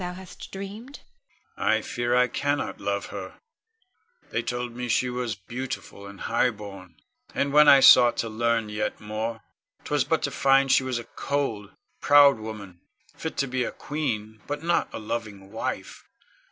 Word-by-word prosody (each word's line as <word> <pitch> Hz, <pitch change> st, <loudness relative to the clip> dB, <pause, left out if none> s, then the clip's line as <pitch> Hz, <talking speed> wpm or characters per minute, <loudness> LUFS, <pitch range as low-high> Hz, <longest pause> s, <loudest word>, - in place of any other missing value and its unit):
I -, -, +1 dB
fear 120 Hz, 0 st, -1 dB
I 125 Hz, 0 st, +4 dB
cannot 145 Hz, +2 st, -2 dB
love 100 Hz, 0 st, -2 dB
her. -, -, -7 dB, 0.9 s
They -, -, 0 dB
told 120 Hz, -1 st, -4 dB
me 125 Hz, 0 st, -4 dB
she 125 Hz, +2 st, +1 dB
was 125 Hz, -3 st, -3 dB
beautiful 120 Hz, -1 st, -7 dB
and 100 Hz, -1 st, -12 dB
highborn; 100 Hz, -7 st, -2 dB, 0.4 s
and 140 Hz, 0 st, 0 dB
when 150 Hz, 0 st, +7 dB
I 140 Hz, -2 st, +8 dB
sought 120 Hz, -2 st, +8 dB
to 115 Hz, -, -1 dB
learn 115 Hz, 0 st, 0 dB
yet 105 Hz, 0 st, -3 dB
more, 110 Hz, +1 st, -4 dB, 0.4 s
'twas -, -, +1 dB
but -, -, 0 dB
to -, -, -1 dB
find 135 Hz, 0 st, +3 dB
she -, -, +5 dB
was 130 Hz, -2 st, -2 dB
a 120 Hz, -, -5 dB
cold, 115 Hz, -7 st, -3 dB, 0.3 s
proud 145 Hz, -3 st, +6 dB
woman, 105 Hz, -5 st, -8 dB, 0.3 s
fit 160 Hz, -, -6 dB
to 140 Hz, -, +1 dB
be 130 Hz, 0 st, -1 dB
a -, -, -3 dB
queen, 110 Hz, -8 st, -4 dB
but 145 Hz, +1 st, -4 dB
not 170 Hz, 0 st, +1 dB
a -, -, -6 dB
loving 105 Hz, -3 st, -5 dB
wife. 110 Hz, -, -5 dB
120 Hz, 155 wpm, -26 LUFS, 105-135 Hz, 0.9 s, I